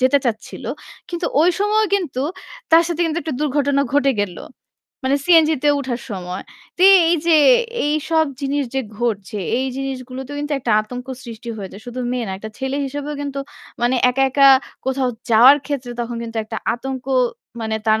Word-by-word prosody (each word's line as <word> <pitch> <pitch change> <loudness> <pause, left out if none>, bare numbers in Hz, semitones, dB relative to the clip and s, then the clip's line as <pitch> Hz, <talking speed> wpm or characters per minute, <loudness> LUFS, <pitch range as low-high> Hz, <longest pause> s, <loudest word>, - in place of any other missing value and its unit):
যেতে 260 +2 +4
চাচ্ছিল। 225 -2 -4 0.4
কিন্তু 345 0 -3
ওই 345 - +5
সময় 425 +1 +3
কিন্তু 305 -9 -1 0.5
তার 330 +1 +8
সাথে 340 0 -3
কিন্তু 325 0 -1
একটা 315 -2 -3
দুর্ঘটনা 285 -1 +1
ঘটে 275 -1 +3
গেল। 180 -4 -5 0.7
মানে 275 - +3
সিএনজি 320 -3 +5
তে - - +5
উঠার 250 -3 -3
সময়। 180 -1 -5 0.3
তো 360 - 0 0.3
এই 345 - +4
যে 325 -2 +6 0.5
এইসব 310 +2 +1 0.2
জিনিস 280 +1 0
যে 270 - +1 0.2
ঘটছে, 215 -3 -2 0.2
এই 265 - -1
জিনিসগুলোতেও 265 +1 -5
কিন্তু 295 +1 -3
একটা 240 -4 -1
আতঙ্ক 245 +4 -7 0.2
সৃষ্টি 235 0 -9
হয়ে 195 -3 -6
যায়। 200 - -11
শুধু 250 +1 -5
মেয়ে 250 -2 -1
না। - - -3
একটা 220 +2 -8
ছেলে 265 +1 -2
হিসেবেও 290 +2 -4
কিন্তু 280 -1 -4 0.4
মানে 250 +2 +2
একা, 270 +2 0
একা 275 +1 +6 0.4
কোথাও 265 -1 0 0.2
যাওয়ার 250 +6 +8
ক্ষেত্রে 260 -4 -4
তখন 235 0 -4
কিন্তু 230 0 -7
একটা 220 +1 -6 0.2
আতঙ্ক 260 +1 -6 0.6
মানে 220 -1 -2
তার 220 0 +3
265 Hz, 175 wpm, -20 LUFS, 235-290 Hz, 0.7 s, তার